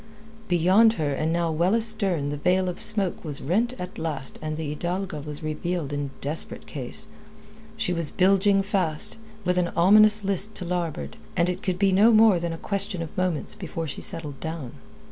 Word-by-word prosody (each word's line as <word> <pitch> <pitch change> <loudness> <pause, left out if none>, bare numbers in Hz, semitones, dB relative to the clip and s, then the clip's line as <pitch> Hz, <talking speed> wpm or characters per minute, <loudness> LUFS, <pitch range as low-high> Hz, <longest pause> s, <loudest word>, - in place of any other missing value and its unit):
Beyond 190 +6 +4
her 155 -7 -1
and 155 +3 -1
now 170 -1 0
well 175 +6 +2
astern 200 -10 +2
the 145 - -3
veil 180 +4 +1
of 180 - -5
smoke 205 -5 +1
was 150 -4 -4
rent 225 - 0
at 180 +2 -7
last 145 -5 -3
and 155 0 -4
the 160 -1 -4
Hidalga 175 -1 -3
was 150 0 -8
revealed 155 0 -3
in 145 -1 -2
desperate 150 +3 -4
case. - - -5 0.7
She 180 - -1
was 165 -3 -1
bilging 195 +1 +3
fast, 185 -6 -1 0.3
with 180 0 +2
an 175 - +1
ominous 210 +4 +5
list 200 +2 +3
to 180 - -3
larboard, 170 - -3 0.2
and 170 +1 +3
it 180 - -3
could 185 -2 -1
be 195 0 +3
no 205 +5 +5
more 215 -4 +6
than 170 0 -3
a 165 - -5
question 200 -1 -2
of 160 - -10
moments 185 -4 -1
before 165 -4 -5
she 150 - -5
settled 150 -5 -4
down. 160 -6 -5
175 Hz, 185 wpm, -25 LUFS, 155-195 Hz, 0.7 s, more